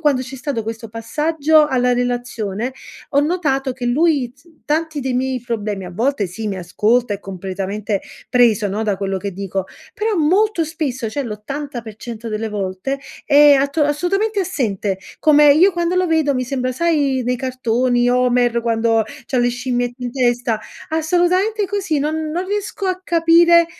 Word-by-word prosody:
quando 290 -5 +2
c'è 260 +1 -8
stato 260 -3 -3
questo 225 0 -6
passaggio 300 +7 +2
alla 250 -2 +2
relazione, 245 -2 -2 0.4
ho 280 - +3
notato 290 -5 0
che 250 0 -7
lui 275 -1 +2
t 275 +2 -26 0.2
tanti 315 0 -1
dei 260 -1 -2
miei 260 0 -1
problemi 215 -5 -3
a 180 - -7
volte 230 0 0
sì, 210 +5 -5
mi 195 - -3
ascolta 210 +6 +1
è 200 - -8
completamente 195 +2 -4 0.3
preso, 230 -4 +3
no, 205 +3 -2
da 210 -3 0
quello 195 0 -2
che 200 +1 -4
dico, 195 0 -4 0.3
però 425 0 -1
molto 360 +3 +2
spesso, 285 -7 -3
cioè 280 +6 -3
l'80% 235 -1 -6
delle 220 +1 -3
volte 205 +6 -3 0.3
è 290 0 +7
atto 280 0 +2
assolutamente 390 +9 0
assente 215 - -1 0.2
come 295 -1 +6
io 350 +7 +5
quando 345 0 -1
lo 365 0 +2
vedo 315 -4 +2
mi 255 0 -1
sembra 255 -1 -2
sai 285 -3 +1
nei 250 +1 0
cartoni, 245 -1 0
Homer 245 -1 +2
quando 225 -1 +2 0.2
c'ha 265 - -2
le 245 0 +2
scimmiette 245 0 -2
in 245 - -2
testa? 245 -3 +1 0.3
Assolutamente 360 +6 +1
così, 380 -5 -1
non 310 +2 -2
non 355 +4 -2
riesco 405 0 -3
a 370 0 -1
capire, 335 0 +5
255 Hz, 160 wpm, -19 LUFS, 225-315 Hz, 0.4 s, è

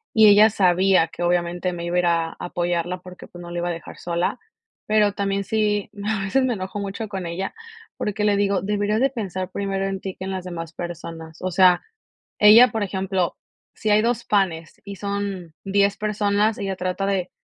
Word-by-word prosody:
Y 220 -1 +7
ella 210 +2 +7
sabía 185 -3 +3
que 175 - -6
obviamente 175 +1 0
me 170 0 -5
iba 175 +1 -2
a - - +4
ir 175 - +1
a 165 -1 +1
apoyarla 175 0 -2
porque, 180 0 -12
pues, 175 - -12
no 175 - -9
la 175 - -5
iba 175 0 -1
a - - 0
dejar 165 -1 -8
sola, 170 0 -1 0.5
pero 210 -1 +3
también 200 0 -1
sí, 210 -1 0 0.2
a 210 -2 0
veces 260 +7 +1
me 255 - +1
enojo 190 -1 -5
mucho 200 +2 -4
con 190 -3 -5
ella, 175 +3 -4 0.4
porque 210 0 -2
le 205 -1 +3
digo: 200 -1 +1
"Deberías 205 +2 0
de 270 - +4
pensar 190 -7 -4
primero 195 0 -2
en 195 -1 -3
ti 190 -1 -5
que 190 - -7
en 190 - -4
las 185 -1 -4
demás 165 -3 -6
personas". 165 -2 -7
O 185 - -1
sea, 180 0 +5 0.6
ella, 220 +4 +9
por 220 -2 -1
ejemplo, 190 -2 -1 0.4
si 215 - -2
hay 210 +1 +5
2 235 0 0
panes 175 -6 -1
y 200 -1 -7
son 200 -4 -4
10 200 0 +2
personas, 210 0 +1
ella 195 -1 -2
trata 185 +2 -2
de 185 -2 -1
195 Hz, 205 wpm, -23 LUFS, 175-205 Hz, 0.6 s, ella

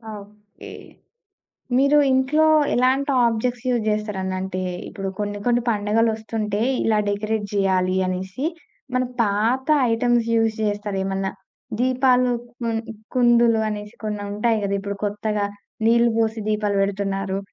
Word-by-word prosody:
Okay. 205 0 -13 1.1
మీరు 280 +3 +4 0.2
ఇంట్లో 270 +4 +3 0.3
ఎలాంటి 260 +3 +2 0.2
ఆబ్జెక్ట్స్ 240 +2 -1
యూజ్ 240 -2 +1
చేస్తరండి? 210 -3 -2
అంటే, 185 -1 -4 0.3
ఇప్పుడు 195 -1 -5
కొన్ని 205 0 -3
కొన్ని 240 0 +2
పండగలొస్తుంటే 220 0 0 0.2
ఇలా 220 -1 +2
డెకరేట్ 210 +1 -1
జేయాలి 190 -2 +1
అనేసి, 185 +7 -4 0.5
మన 255 0 +2 0.2
పాత 225 +5 0 0.3
ఐటమ్స్ 240 0 +2
యూజ్ 225 -1 +2
జేస్తారేమన్నా? 195 -2 -2 0.5
దీపాలు 255 0 +3 0.3
కుంద్ 225 0 -2 0.2
కుందులు 240 -2 +4
అనేసి 210 +1 -6
కొన్ని 210 -1 -3
ఉంటాయి 220 +2 +1
గదా! 200 0 -1
ఇప్పుడు 200 0 -5
కొత్తగా 210 0 -1 0.4
నీళ్ళు 235 +1 +4
పోసి 225 0 0
దీపాలు 210 -1 0
పెడుతున్నారు. 195 -1 -2
215 Hz, 115 wpm, -22 LUFS, 200-235 Hz, 1.1 s, మీరు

